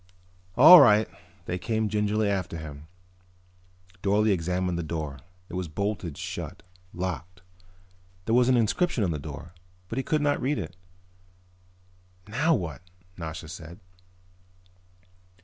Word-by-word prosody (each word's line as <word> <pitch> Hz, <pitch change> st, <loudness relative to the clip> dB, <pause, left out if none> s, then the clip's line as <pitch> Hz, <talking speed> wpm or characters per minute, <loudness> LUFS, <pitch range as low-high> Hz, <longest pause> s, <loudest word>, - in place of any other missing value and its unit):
"All 160 Hz, +8 st, +11 dB
right." 105 Hz, -1 st, +5 dB, 0.4 s
They 90 Hz, +1 st, -3 dB
came 110 Hz, +2 st, -1 dB
gingerly 105 Hz, +1 st, 0 dB
after 95 Hz, -4 st, -2 dB
him. 75 Hz, -1 st, -9 dB, 1.1 s
Dorle 105 Hz, +2 st, +2 dB
examined 90 Hz, 0 st, -1 dB
the -, -, 0 dB
door. 80 Hz, -4 st, -4 dB, 0.3 s
It -, -, -13 dB
was 90 Hz, -1 st, -3 dB
bolted 90 Hz, -2 st, -3 dB
shut, -, -, -6 dB, 0.3 s
locked. 90 Hz, +1 st, -5 dB, 0.8 s
There 115 Hz, -, 0 dB
was 125 Hz, +1 st, +4 dB
an 125 Hz, -, +4 dB
inscription 120 Hz, -, +1 dB
on 90 Hz, -, 0 dB
the 75 Hz, -, -3 dB
door 75 Hz, +3 st, -9 dB, 0.4 s
but 115 Hz, -, -4 dB
he -, -, -1 dB
could 155 Hz, +1 st, 0 dB
not 145 Hz, 0 st, +1 dB
read 140 Hz, +3 st, 0 dB
it. 85 Hz, -2 st, -5 dB, 1.5 s
"Now 150 Hz, +10 st, +2 dB
what?" 80 Hz, -, -4 dB, 0.3 s
Nasha 80 Hz, -2 st, -6 dB
said. 85 Hz, +2 st, -10 dB
95 Hz, 130 wpm, -27 LUFS, 85-110 Hz, 1.5 s, All